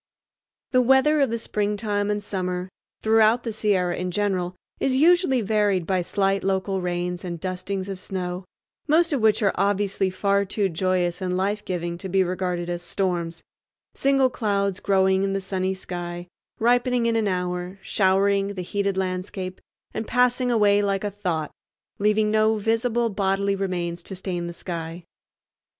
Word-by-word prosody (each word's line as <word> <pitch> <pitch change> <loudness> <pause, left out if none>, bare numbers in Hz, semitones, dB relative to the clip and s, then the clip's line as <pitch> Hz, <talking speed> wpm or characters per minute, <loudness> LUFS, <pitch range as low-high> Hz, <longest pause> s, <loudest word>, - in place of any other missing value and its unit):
The 255 - +4
weather 265 +4 +4
of 275 - +3
the 230 - -1
springtime 205 -1 -1
and 205 0 -1
summer, 185 -2 -3 0.3
throughout 220 +2 +4
the 230 - -3
Sierra 195 -5 +1
in 180 0 -3
general, 185 -2 -1 0.2
is 265 -1 +1
usually 320 -3 +4
varied 205 -4 +1
by 185 +1 +1
slight 195 +2 0
local 190 0 0
rains 180 0 -2
and 170 -2 -5
dustings 185 +2 -3
of 195 -2 -5
snow, 185 -1 -4 0.4
most 330 +2 +3
of 270 - 0
which 220 0 +3
are 195 - +4
obviously 200 -1 +1
far 200 +1 +1
too 200 0 -1
joyous 180 +1 0
and 180 -1 -1
life 205 +2 -1
giving 175 -1 -3
to 190 0 -6
be 190 +1 +3
regarded 180 -1 -2
as 175 0 -3
storms—single 185 +9 -2
clouds 200 -4 0
growing 190 -1 +3
in 195 0 0
the 195 - 0
sunny 190 0 -2
sky, 175 -1 -6 0.3
ripening 245 +1 +2
in 230 -1 +2
an 220 -2 +1
hour, 180 0 -2
showering 195 +1 +2
the 185 - -4
heated 200 +1 -1
landscape, 185 0 -3 0.3
and 220 - -4
passing 250 0 +2
away 205 -3 +4
like 195 -1 0
a 205 - -2
thought, 175 -6 -2 0.5
leaving 210 +1 +2
no 220 0 +3
visible 230 +2 +1
bodily 195 0 0
remains 175 -3 -2
to 190 - -6
stain 180 -2 -4
the - - -4
sky. 170 -1 -6
195 Hz, 160 wpm, -24 LUFS, 180-215 Hz, 0.5 s, The